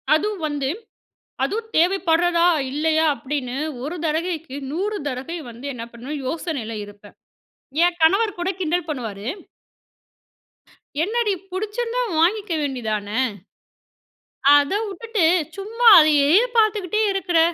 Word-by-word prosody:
அதுவும் 410 +3 -2
வந்து, 285 -2 -2 0.7
அதுவும் 445 +2 -2
தேவைப்பட்றதா 345 -1 +3 0.3
இல்லையா! 315 +2 +1
அப்படின்னு 270 -3 -4 0.3
ஒரு 305 +6 -4
தடவைக்கு 320 -2 -2 0.2
100 405 +6 -2
தடவை 270 +6 -4
வந்து 235 +3 -11
என்ன 235 -2 -6
பண்ணுவேன் 270 +5 -6
யோசனையில 275 -8 -4
இருப்பேன். 205 0 -15 0.7
ஏ - - +7 0.2
கணவர் 395 +6 +3
கூட 350 +1 -2
கிண்டல் 345 -1 -1
பண்ணுவாரு. 225 -8 -5 1.8
என்னடி! 435 +2 0 0.2
புடிச்சிருந்தா 460 +5 -2 0.2
வாங்கிக்க 385 +3 +1
வேண்டியதானே. 220 -6 -3 1.4
அத 290 +2 +2 0.2
உட்டுட்டு 430 0 -1 0.3
சும்மா 455 +4 +2
அதையே 295 -2 +4 0.3
பாத்துக்குட்டே 430 -2 +2
இருக்குற 360 -3 0
325 Hz, 105 wpm, -22 LUFS, 280-395 Hz, 1.8 s, ஏ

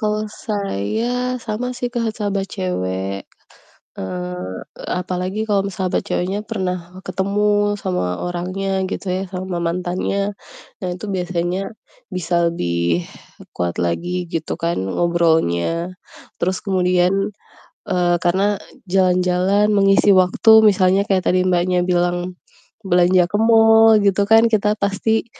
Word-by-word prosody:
Kalau 215 -1 -1
saya, 220 - -2
sama 245 +3 -3
sih, 245 - -2
Kak, 230 -2 -1
sahabat 200 -2 -2
cewek. 95 +2 -3 0.8
Eee, 90 0 -5 0.5
apalagi 185 +3 -3
kalau 200 -2 +2
me 195 - -8
sahabat 185 -1 0
ceweknya 190 +3 -1
pernah, 185 -4 -1 0.3
ketemu 200 +3 0 0.3
sama 180 - -1 0.2
orangnya 185 +3 -3 0.2
gitu - - -5
ya, 190 - -2
sama 185 -1 -4
mantannya, 180 +3 -1 0.6
nah 185 - -3
itu 180 - -9
biasanya 180 0 -2 0.5
bisa 170 -1 0
lebih 85 - -1 0.5
kuat 85 -1 -2
lagi 175 - -1
gitu 160 -1 -2
kan 170 - -1 0.2
ngobrolnya. 170 - +1 0.5
Terus 185 +2 0
kemudian, 180 -2 +2 0.8
eee, 175 -1 +2
karena 190 +3 +2 0.4
jalan-jalan 185 +2 +2
mengisi 195 0 +4
waktu, 185 +4 +4
misalnya 195 -2 +4
kaya 195 - +3
tadi 185 0 +2
Mbaknya 180 0 +2
bilang, 175 0 -1 0.5
belanja 180 0 +4
ke 180 - -20
mall 225 -1 +6
gitu 200 0 +2
kan, 225 +1 +7
kita 210 -2 +2
pasti, 215 +3 0
185 Hz, 120 wpm, -20 LUFS, 175-200 Hz, 0.8 s, kan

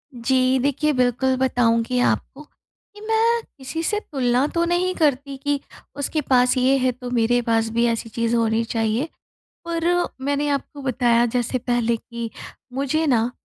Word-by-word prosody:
जी 255 +2 +2
देखिए, 285 +3 +1
बिल्कुल 255 +1 +1
बताऊँगी 245 -1 +1
आपको 270 +3 -1
कि 415 +7 -22
मैं 455 +1 +2 0.2
किसी 280 +5 -5
से 420 +5 0
तुलना 260 - 0
तो 335 - +2
नहीं 355 +2 +1
करती 280 -3 0
कि 285 +1 -1 0.4
उसके 285 +2 -2
पास 250 -1 +4
ये 255 +2 +3
है 255 -1 +1
तो 250 0 -8
मेरे 245 0 +2
पास 225 -1 +2
भी 235 +1 +2
ऐसी 230 0 -2
चीज़ 230 +1 -1
होनी 225 0 +1
चाहिए। 225 +5 -1 0.6
पर 335 -1 -3 0.4
मैंने 285 +1 0
आपको 280 0 -3
बताया 240 -2 +2
जैसे 245 +2 -1
पहले 240 -1 0
कि 235 0 -7 0.4
मुझे 280 +4 0
ना 235 -3 +2
255 Hz, 155 wpm, -22 LUFS, 235-285 Hz, 0.6 s, पास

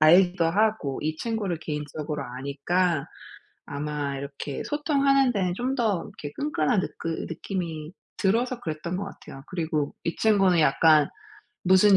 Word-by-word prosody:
알기도 175 +3 +6
하고 200 -6 +1
이 155 +1 -1
친구를 210 -5 -2
개인적으로 150 -1 -4
아니까 140 +6 0 0.6
아마 145 -1 -3
이렇게 140 0 -5
소통하는 275 -3 +3
데는 185 -5 0
좀 255 +5 -1
더 215 -9 +1
이렇게 145 - -8
끈끈한 200 - +1
느끄 165 -3 -4
느낌이 165 -2 -4 0.3
들어서 240 +5 +1
그랬던 165 0 -3
것 200 - -2
같아요. 135 -7 -10
그리고 160 -5 -1
이 165 - -1
친구는 195 -5 +4
약간 155 0 +5 0.6
무슨 190 +2 +7
170 Hz, 310 characters per minute, -26 LUFS, 150-205 Hz, 0.6 s, 무슨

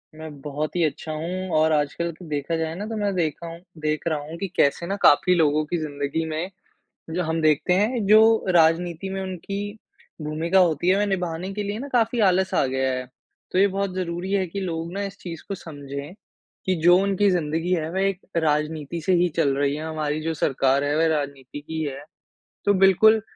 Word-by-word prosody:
मैं 160 0 -8
बहुत 150 +3 -4
ही 175 - +2
अच्छा 155 +1 -2
हूँ 180 +4 -4
और 155 +1 +3
आजकल 155 +3 0
कि 180 - -10
देखा 145 +2 -2
जाए 160 0 -2
ना 205 +4 -5
तो 225 - -4
मैं 205 -1 0
देखा 170 -1 -2
हूँ 165 0 -8 0.2
देख 155 +1 -1
रहा 155 -2 0
हूँ 165 +2 -7
कि 195 - -2
कैसे 140 +4 +2
ना 195 - -1
काफ़ी 180 +5 +5
लोगों 155 -2 +3
की 175 +3 -2
जिंदगी 145 0 -2
में 160 +4 -3 0.6
जो 180 +2 0
हम 160 0 -1
देखते 155 +3 +3
हैं 215 +4 +1
जो 215 +2 +8 0.4
राजनीति 170 +2 +2
में 195 - -3
उनकी 190 +1 -5 0.6
भूमिका 160 +5 +1
होती 175 -1 +2
है 190 - +5
वह 205 - +2
निभाने 180 -1 -2
के 210 0 -3
लिए 205 +2 -3
ना 275 - -5
काफ़ी 235 0 +2
आलस 185 +1 +1
आ 140 - +3
गया 130 0 0
है। 125 0 -3 0.5
तो 185 - +1
ये 200 - +6
बहुत 195 -1 -2
ज़रूरी 180 +1 -3
है 195 -2 +2
कि 200 +4 -5
लोग 170 -3 -3
ना 200 - -3
इस 195 0 -6
चीज़ 165 -3 -8
को 200 - -3
समझें 145 -2 -8 0.5
कि 185 - +1
जो 175 +1 +7
उनकी 200 +1 +2
जिंदगी 165 +1 0
है 160 -3 -1
वे 190 +1 +1
एक 190 -2 -5 0.2
राजनीति 155 0 -1
से 185 +4 +1
ही 175 0 +4
चल 140 -4 +2
रही 140 0 +1
है, 155 - -5
हमारी 155 -1 -2
जो 165 +1 -2
सरकार 135 -2 +1
है 145 +1 0
वह 165 - +3
राजनीति 140 -1 -5
की 160 +2 -5
है। 140 -1 -5 0.6
तो 205 - +4
बिल्कुल 200 +3 +5
165 Hz, 210 wpm, -24 LUFS, 150-190 Hz, 0.6 s, जो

